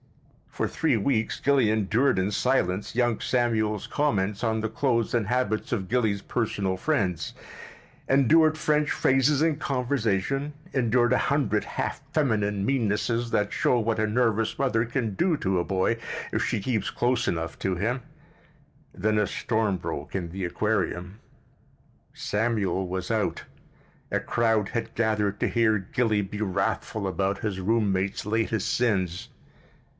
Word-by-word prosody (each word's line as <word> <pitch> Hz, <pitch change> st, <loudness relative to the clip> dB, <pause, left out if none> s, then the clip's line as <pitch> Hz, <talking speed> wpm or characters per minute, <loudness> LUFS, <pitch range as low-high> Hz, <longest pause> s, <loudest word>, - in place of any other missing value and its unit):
For -, -, -2 dB
three 150 Hz, -7 st, +1 dB
weeks 110 Hz, 0 st, 0 dB
Gilly 135 Hz, -5 st, +3 dB
endured 110 Hz, +4 st, +2 dB
in 95 Hz, +2 st, 0 dB
silence 105 Hz, -5 st, 0 dB
young 120 Hz, -2 st, +1 dB
Samuel's 110 Hz, -4 st, 0 dB
comments 105 Hz, -9 st, 0 dB
on 110 Hz, -1 st, +1 dB
the 110 Hz, -, -1 dB
clothes 115 Hz, -1 st, 0 dB
and 115 Hz, -4 st, +1 dB
habits 125 Hz, -2 st, -1 dB
of 100 Hz, -6 st, -1 dB
Gilly's 110 Hz, -3 st, 0 dB
personal 100 Hz, -5 st, -1 dB
friends, 95 Hz, -, -1 dB, 0.8 s
endured 155 Hz, +4 st, +5 dB
French 150 Hz, -1 st, +1 dB
phrases 135 Hz, +2 st, +2 dB
in 160 Hz, -3 st, +2 dB
conversation, 135 Hz, 0 st, -1 dB, 0.2 s
endured 120 Hz, -1 st, +3 dB
a -, -, +4 dB
hundred -, -, +1 dB
half -, -, -4 dB
feminine 105 Hz, -9 st, +1 dB
meannesses 115 Hz, -1 st, 0 dB
that 105 Hz, -2 st, 0 dB
show 125 Hz, -, +2 dB
what 110 Hz, 0 st, 0 dB
a 110 Hz, -, +2 dB
nervous 115 Hz, -1 st, +1 dB
mother 125 Hz, -4 st, +1 dB
can 115 Hz, -3 st, -2 dB
do 165 Hz, -, +1 dB
to 95 Hz, -5 st, 0 dB
a -, -, +1 dB
boy, 95 Hz, +5 st, 0 dB, 0.4 s
if -, -, +1 dB
she -, -, 0 dB
keeps 110 Hz, +1 st, -1 dB
close 120 Hz, 0 st, 0 dB
enough 80 Hz, -1 st, -3 dB
to 95 Hz, -1 st, -1 dB
him—then 110 Hz, -1 st, -5 dB
a 105 Hz, -, +2 dB
storm 110 Hz, -4 st, 0 dB
broke 80 Hz, -2 st, -5 dB
in 85 Hz, -3 st, -3 dB
the 95 Hz, +1 st, -5 dB
aquarium. 95 Hz, 0 st, -2 dB, 0.9 s
Samuel 105 Hz, -3 st, -1 dB
was 90 Hz, 0 st, -4 dB
out. 110 Hz, -2 st, -1 dB, 0.7 s
A -, -, +1 dB
crowd 115 Hz, -3 st, +1 dB
had 115 Hz, -1 st, -4 dB
gathered 105 Hz, -3 st, 0 dB
to -, -, +1 dB
hear 115 Hz, -2 st, +3 dB
Gilly 105 Hz, +2 st, 0 dB
be 105 Hz, +2 st, -6 dB
wrathful 100 Hz, +1 st, -1 dB
about 95 Hz, +1 st, -1 dB
his 100 Hz, -3 st, -3 dB
roommate's 100 Hz, -2 st, 0 dB
latest 110 Hz, -1 st, 0 dB
sins. 95 Hz, -8 st, 0 dB
110 Hz, 140 wpm, -26 LUFS, 100-125 Hz, 0.9 s, endured